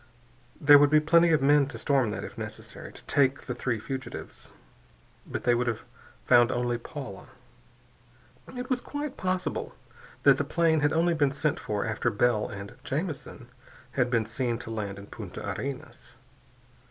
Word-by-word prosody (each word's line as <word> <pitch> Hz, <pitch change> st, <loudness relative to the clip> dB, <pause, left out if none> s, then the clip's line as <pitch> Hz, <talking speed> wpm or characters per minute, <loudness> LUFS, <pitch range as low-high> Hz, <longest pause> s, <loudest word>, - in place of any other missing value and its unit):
There 145 Hz, 0 st, +8 dB
would 145 Hz, 0 st, +5 dB
be 155 Hz, +1 st, +6 dB
plenty 170 Hz, +2 st, +5 dB
of 155 Hz, -4 st, +3 dB
men 145 Hz, 0 st, +5 dB
to 135 Hz, -5 st, -8 dB
storm 135 Hz, -1 st, +2 dB
that, -, -, -4 dB
if -, -, -8 dB
necessary, -, -, -8 dB
to -, -, -13 dB
take 140 Hz, -2 st, +2 dB
the 125 Hz, -, -3 dB
three 120 Hz, -1 st, -1 dB
fugitives. 130 Hz, +2 st, -7 dB, 0.8 s
But -, -, -4 dB
they 120 Hz, -, +4 dB
would 120 Hz, +1 st, 0 dB
have 120 Hz, 0 st, -2 dB, 0.4 s
found 120 Hz, -1 st, +5 dB
only 120 Hz, -1 st, -1 dB
Paula. 125 Hz, -6 st, -8 dB, 1.3 s
It 250 Hz, +1 st, -4 dB
was 255 Hz, -2 st, 0 dB
quite 290 Hz, 0 st, -5 dB
possible 185 Hz, 0 st, -2 dB, 0.5 s
that -, -, +6 dB
the -, -, +2 dB
plane 165 Hz, -2 st, +2 dB
had 145 Hz, 0 st, +2 dB
only 170 Hz, +2 st, +2 dB
been 145 Hz, -3 st, +2 dB
sent 145 Hz, +2 st, -1 dB
for 105 Hz, -1 st, -2 dB
after 115 Hz, +2 st, 0 dB
Bell 110 Hz, 0 st, +1 dB
and 100 Hz, -2 st, -8 dB
Jamison 140 Hz, -5 st, -4 dB, 0.4 s
had 125 Hz, -1 st, +1 dB
been 115 Hz, -3 st, +1 dB
seen 120 Hz, +1 st, -2 dB
to 115 Hz, -, -6 dB
land 100 Hz, -3 st, -4 dB
in 100 Hz, -, -9 dB
Punta -, -, -8 dB
Arenas. 140 Hz, -1 st, -6 dB
135 Hz, 165 wpm, -28 LUFS, 120-150 Hz, 1.3 s, There